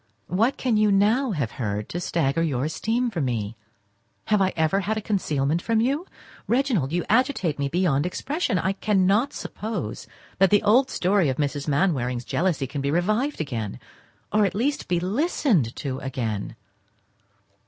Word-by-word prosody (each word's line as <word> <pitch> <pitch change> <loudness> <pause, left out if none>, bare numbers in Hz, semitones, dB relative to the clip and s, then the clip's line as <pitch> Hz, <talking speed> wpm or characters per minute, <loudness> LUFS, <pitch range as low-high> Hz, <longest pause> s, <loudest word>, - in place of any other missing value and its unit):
What 225 +9 +1
can 245 -4 +1
you 210 -1 +4
now 215 +7 +3
have 145 - -2
heard 105 -1 -2
to 175 - -3
stagger 165 -3 0
your 140 -5 0
esteem 230 +9 -1
for 175 -6 -2
me? 115 -5 -2 0.7
Have 210 -2 +2
I 190 -1 +3
ever 160 +4 +2
had 210 +3 -1
a - - 0
concealment 165 -7 0
from 225 +2 +1
you? 280 +10 0 0.4
Reginald, 235 - +1
you 175 0 -1
agitate 220 - +1
me 140 - 0
beyond 165 -2 +1
expression, 270 - -1
I 190 +3 0
cannot 205 +5 +2
suppose 205 - -5 0.3
that 195 0 +5
the 205 +1 +4
old 255 +6 +4
story 185 -3 +2
of 130 - -2
Mrs. 145 -1 -2
Mainwaring's 135 -6 0
jealousy 170 -6 0
can 140 +2 -4
be 140 - -1
revived 215 - 0
again, 115 - -4 0.5
or 210 0 +4
at 195 -2 0
least 275 +7 -1
be 175 -1 +1
listened 195 - +1
to 135 -2 -4
again. 115 -7 -3
180 Hz, 165 wpm, -24 LUFS, 140-215 Hz, 0.7 s, that